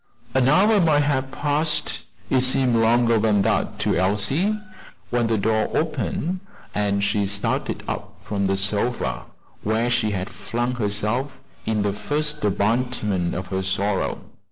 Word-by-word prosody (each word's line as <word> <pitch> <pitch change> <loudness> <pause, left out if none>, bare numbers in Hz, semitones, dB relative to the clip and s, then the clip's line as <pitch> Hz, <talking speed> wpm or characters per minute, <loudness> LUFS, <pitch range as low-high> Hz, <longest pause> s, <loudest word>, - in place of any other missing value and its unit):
An 130 -1 +3
hour 200 +7 +5
might 150 -3 +4
have 135 -2 0
passed 150 +3 -1 0.3
it 130 - +4
seemed 130 -1 +3
longer 115 0 +4
than 105 -2 +3
that 110 0 0
to - - +1
Elsie 105 - +1 0.5
when 120 -1 +2
the 115 -1 +1
door 110 +1 +1
opened, 165 +3 -1 0.3
and 100 -1 +1
she 100 0 +1
started 100 0 -2
up - - -5
from 100 -2 -1
the 95 0 +1
sofa, 105 +5 0 0.4
where 110 +3 0
she 115 -2 +2
had 95 -3 -2
flung 120 +2 -2
herself 110 +4 -1 0.3
in 110 -2 +1
the 100 -1 0
first 150 +7 -2
abandonment 105 -3 0
of 95 +1 -3
her 95 -1 -1
sorrow. 95 +1 -1
115 Hz, 145 wpm, -23 LUFS, 100-130 Hz, 0.5 s, hour